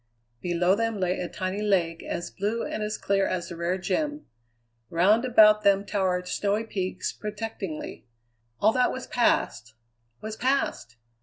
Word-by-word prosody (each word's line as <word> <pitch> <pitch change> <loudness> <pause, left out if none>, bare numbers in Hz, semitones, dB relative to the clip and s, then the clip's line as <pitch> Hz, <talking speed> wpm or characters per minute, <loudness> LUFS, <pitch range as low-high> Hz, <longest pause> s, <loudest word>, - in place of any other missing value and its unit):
Below 175 +1 +2
them 225 0 -1
lay 185 0 0
a 180 - -3
tiny 190 +1 -3
lake 175 -5 +1
as 170 - -5
blue 210 +4 -2
and 215 - -4
as 210 0 -2
clear 195 -1 +1
as 180 -1 -3
a - - -5
rare 170 +2 -1
gem; 295 - -2 0.6
round 205 +8 +3
about 215 -3 +6
them 200 -1 +3
towered 185 -3 0
snowy 205 +3 0
peaks, 190 -4 -3
protectingly. 210 - -6 0.5
All 215 - +5
that 250 +1 +2
was 255 - -5
past 120 - 0 0.4
was 215 0 -6
past! 255 - -1
200 Hz, 150 wpm, -26 LUFS, 180-220 Hz, 0.6 s, about